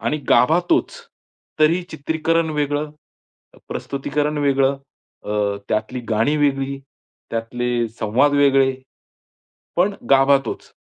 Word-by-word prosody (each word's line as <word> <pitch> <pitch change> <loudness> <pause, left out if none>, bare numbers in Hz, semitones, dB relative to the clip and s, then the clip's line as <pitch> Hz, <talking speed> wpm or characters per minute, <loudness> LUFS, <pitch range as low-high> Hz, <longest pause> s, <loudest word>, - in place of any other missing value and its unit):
आणि 150 - -1
गाभा 155 +8 +5
तोच, - - +2 0.7
तरी 165 +4 +4
चित्रीकरण 160 +2 -1
वेगळं, 150 0 -1 0.8
प्रस्तुतीकरण 150 +2 -2
वेगळं, 140 -1 +2 0.5
अ, 105 -1 -1
त्यातली 110 +4 -2
गाणी 115 +8 +2
वेगळी, 140 -1 0 0.5
त्यातले 120 +1 -2
संवाद 125 +7 +2
वेगळे, 135 -2 +4 1.0
पण 195 +3 +2 0.2
गाभा 135 +1 +6
तोच. - - -7
140 Hz, 100 wpm, -20 LUFS, 125-150 Hz, 1.0 s, गाभा